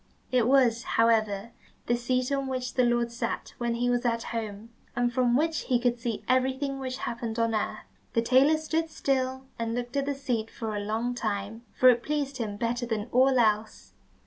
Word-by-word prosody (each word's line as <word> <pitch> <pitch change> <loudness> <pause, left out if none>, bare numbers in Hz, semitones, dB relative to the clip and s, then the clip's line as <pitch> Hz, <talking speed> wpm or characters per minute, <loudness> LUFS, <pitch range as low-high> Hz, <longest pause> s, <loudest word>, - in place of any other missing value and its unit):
It 245 -3 +3
was, 250 -4 +4 0.2
however, 225 -2 +2 0.3
the 240 - +2
seat 255 +2 -1
on 275 -1 0
which 255 -1 -3
the 255 - +3
Lord 240 0 +1
sat 235 - -4
when 235 -1 0
he 245 +1 0
was 245 0 +1
at 230 -1 0
home, 220 0 -5 0.2
and 245 0 +1
from 245 -1 +3
which 320 +1 0
he 250 -2 +2
could 240 0 0
see 230 -2 -3
everything 265 +2 +1
which 260 -1 -4
happened 235 -2 -4
on 230 -1 +1
earth. 215 - -2 0.3
The 230 - +2
tailor 265 +6 +5
stood 320 +1 -1
still, 260 -3 -1 0.2
and 230 0 -2
looked 245 +1 -4
at 280 0 0
the 285 - 0
seat 240 -5 -2
for 220 -2 -5
a - - -1
long 225 +4 -1
time, 220 -1 -4
for 255 - +5
it 240 -1 +4
pleased 285 0 -2
him 210 -4 -3
better 235 +2 -1
than 225 0 -2
all 260 +1 +4
else. 215 -2 0
240 Hz, 200 wpm, -28 LUFS, 230-260 Hz, 0.3 s, tailor